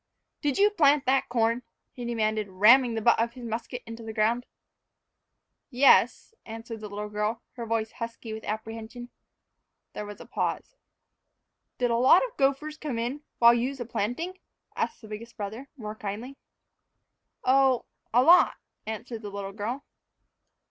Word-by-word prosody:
"Did 290 -3 0
you 415 +1 +5
plant 295 -7 +4
that 265 +1 +2
corn?" 230 0 +1 0.3
he 245 - -8
demanded, 215 -2 0
ramming 230 +6 +5
the 220 - -2
butt 235 - +5
of 235 +1 0
his 245 -1 -9
musket 230 +2 -5
into 230 0 -8
the 220 -1 -7
ground. 230 +3 +1 1.2
"Yes," 275 - +4
answered 225 0 -8
the 210 - -6
little 205 +1 -5
girl, 210 +2 -2
her 235 -2 -7
voice 220 -1 -1
husky 230 -1 -6
with 220 - -7
apprehension. 225 +3 -6 0.8
There 210 - -5
was 205 - -9
a - - -10
pause. - - -3 1.0
"Did 245 -1 +1
a 230 - +2
lot 260 - +6
of - - -10
gophers 280 +3 0
come 285 -6 -3
in 245 +5 -3 0.2
while 235 0 +7
you's 255 +3 -1
a 240 - -3
planting?" 245 - -3 0.4
asked - - -2
the - - -10
biggest 220 +2 -9
brother, 220 +6 -6
more 215 -3 -6
kindly. 220 +6 -6 1.1
"Oh, 265 -1 +4 0.3
a 245 +2 +5
lot," 345 +6 +6 0.3
answered 220 +1 -5
the 205 - -6
little 200 -1 -6
girl. 225 +7 -4
235 Hz, 155 wpm, -27 LUFS, 220-260 Hz, 1.2 s, while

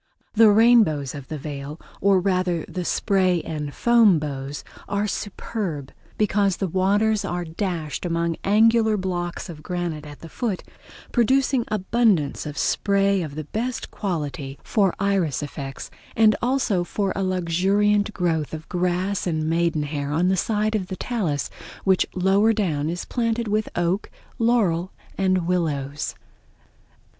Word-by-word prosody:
The 225 0 +7
rainbows 210 - +4
of 140 -3 -8
the 155 - -5
Veil, 145 +1 -6 0.2
or 195 -1 +4
rather 185 -3 0
the 180 - -4
spray 185 -3 +1
and 150 -2 -4
foam 230 -2 +5
bows, 140 -1 -5 0.3
are 200 +1 0
superb, 195 - -4 0.3
because 200 -3 +2
the 195 - -1
waters 200 +4 +2
are 175 0 -3
dashed 165 -3 -3
among 170 -1 -1
angular 220 +1 +4
blocks 175 -2 -3
of 160 -3 -9
granite 175 -2 -3
at 145 -1 -11
the 165 - -8
foot, 210 +1 -3 0.5
producing 260 +1 +2
abundance 205 -8 +1
of 145 -1 -7
spray 200 +2 +2
of 150 -4 -5
the 155 - -4
best 235 - -4
quality 145 -8 -4
for 195 -5 +1
iris 190 -8 0
effects, 140 -2 -7 0.2
and 215 -1 +5
also 245 -7 +1
for 195 +2 -2
a - - -1
luxuriant 195 +4 +2
growth 165 -6 -1
of 155 +1 -9
grass 180 +2 0
and 155 -2 -1
maiden 165 -2 +1
hair 145 -1 -3
on 170 +5 +2
the 190 - +3
side 215 +3 0
of 200 -4 -1
the 185 - -5
talus, 180 - -1 0.4
which 190 -1 +3
lower 195 +4 +3
down 160 -8 0
is 175 +2 -4
planted 230 -1 -1
with 215 +1 0
oak, 175 +4 0 0.3
laurel 200 -7 +2 0.2
and 185 -2 +1
willows. 150 -5 -1
185 Hz, 145 wpm, -23 LUFS, 160-210 Hz, 0.5 s, The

